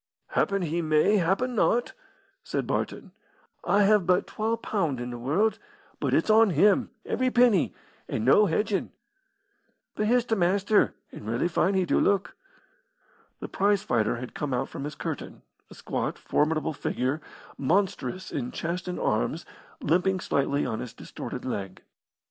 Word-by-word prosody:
"Happen 200 -1 +1
he 170 +1 -1
may 155 +6 +3
happen 195 +8 +1
not," 240 +1 +1 0.5
said - - -2
Barton. - - -3 0.5
"I 205 +1 +3
have 205 -3 +4
but 180 0 +3
twa 225 +2 -2
pund 165 - -1
in 120 0 -4
the 120 - -5
world, 175 - +1 0.4
but - - -1
it's - - +3
on 220 0 +6
him, 200 - +3 0.2
every 255 0 0
penny, 240 -7 +3 0.3
and 110 - -2
no 205 +11 +6
hedgin'. 200 +4 0 1.0
But 210 - -1
here's 245 +1 +3
t' 230 - -1
Maister, 200 +2 +2 0.2
and 105 - -10
rarely 115 +8 0
fine 190 +2 +1
he 190 -1 +2
do - - +2
look." 200 -1 +1 1.1
The - - -4
prize 200 0 +1
fighter 115 - +1
had 120 +1 -7
come 140 -3 -2
out 125 - -2
from 140 - -6
his 150 - -6
curtain, - - -6 0.3
a - - -13
squat, - - -3
formidable 155 +1 0
figure, 135 +1 -2 0.3
monstrous 185 +4 -1
in 125 -3 -3
chest 175 +3 -4
and 180 - -3
arms, 130 +9 -1 0.4
limping 185 +4 +2
slightly 140 +1 0
on 110 -3 -3
his 125 -2 -6
distorted 125 - -7
leg. 100 -7 -5
180 Hz, 155 wpm, -27 LUFS, 140-205 Hz, 1.1 s, on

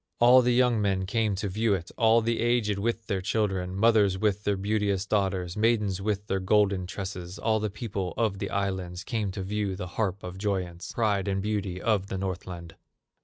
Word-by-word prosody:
All 125 +2 +7
the 125 0 +2
young 125 -3 +3
men 95 -2 0
came 110 +1 0
to 100 +2 -3
view 105 +2 +1
it, 85 -2 -6
All 115 0 +4
the 115 +1 0
aged 115 -4 +1
with 115 +1 -1
their 100 -3 -1
children, 95 -2 -1
Mothers 105 -2 +4
with 105 0 0
their 100 -1 +1
beauteous 100 -1 0
daughters, 95 -4 0
Maidens 105 -4 +1
with 105 0 -1
their 95 -2 -1
golden 95 -1 +2
tresses; 90 -1 -6
All 110 -1 +1
the 105 0 -1
people 100 -3 -4
on 105 -4 0
the - - -3
islands 95 -2 -2
Came 110 -5 -2
to 95 -1 -4
view 100 0 -2
the 90 - -5 0.2
harp 100 -2 -1
of 90 +1 -7
joyance, 95 -4 -3
Pride 105 -4 0
and 95 -1 0
beauty 100 -3 -2
of 105 -2 +1
the 95 - -4
Northland. 90 -3 -5
100 Hz, 195 wpm, -27 LUFS, 95-110 Hz, 0.2 s, All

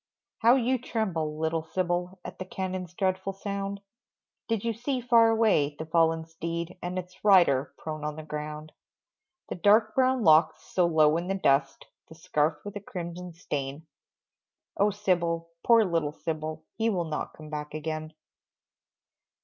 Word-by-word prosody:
How 235 +3 +6
you 255 0 +1
tremble, 170 -11 -2
little 160 +1 0
Sybil, 180 +2 -2
At - - -8
the - - -3
cannons' 185 -2 -5
dreadful 190 +1 -1
sound, 200 0 -4 0.7
Did 225 -3 -1
you 230 - +1
see 250 +4 -2
far 235 -2 +5
away, 210 -11 +2
the 160 - -5
fallen 165 0 +2
steed, 170 +1 -5
And 180 +1 -4
its 180 0 -7
rider 160 -10 +5
prone 155 -1 -6
on 150 0 -3
the 155 - -7
ground? 150 0 -6 0.8
The - - -2
dark 215 +4 +4
brown 260 -2 +2
locks 160 -2 +5
so 180 -2 +1
low 155 -1 +4
in 170 +1 -3
the 195 - 0
dust, 135 -6 +1 0.2
The 160 - -12
scarf 150 0 -1
with 205 0 -7
a - - -7
crimson 180 -2 -7
stain 145 -2 -5 0.9
Oh, 205 +1 +3
Sybil, 170 -5 -1
poor 230 -2 +6
little 165 -5 0
Sybil, 155 -1 -4 0.2
He 225 +1 +2
will 180 -5 0
not 155 -1 -4
come 155 -1 -12
back 150 0 -5
again. 155 0 -4
170 Hz, 155 wpm, -28 LUFS, 155-200 Hz, 0.9 s, How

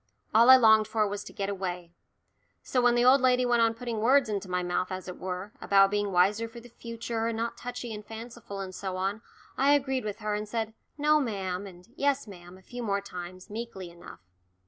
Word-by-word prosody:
All 230 +3 +6
I 260 - +12
longed 220 -3 +6
for 215 -1 +1
was 205 0 -4
to - - -9
get 195 - -3
away. 180 -3 -4 0.7
So 250 - 0
when 245 0 +4
the 240 0 +3
old 260 +2 +6
lady 250 -1 +3
went 240 -1 +3
on 225 0 +3
putting 230 -1 -4
words 250 +2 +4
into 200 -2 -3
my 180 0 -1
mouth, 180 +1 -1
as 185 0 -5
it 180 - -7
were, 185 +2 -5
about 195 0 +5
being 205 -1 0
wiser 200 +5 +2
for 235 +1 -10
the 240 +1 -14
future, 230 -1 -4
and 230 -1 -2
not 230 +1 -2
touchy 245 -1 -6
and 210 0 -7
fanciful, 225 -2 -8
and 190 -1 -6
so 190 -1 -4
on, 195 +3 -2 0.4
I 280 +2 +5
agreed 265 -2 -1
with 210 -2 -4
her 210 -1 -3
and 210 0 -3
said 225 -1 -2 0.2
"No, 300 +1 +4
ma'am" 195 -6 -3
and 180 0 -14
"Yes, 280 -1 +1
ma'am" 180 -3 -12
a 190 - -19
few 245 +5 -8
more 200 -3 0
times, 185 0 -9
meekly 210 -5 -6
enough. 170 0 -13
215 Hz, 220 wpm, -28 LUFS, 190-240 Hz, 0.7 s, I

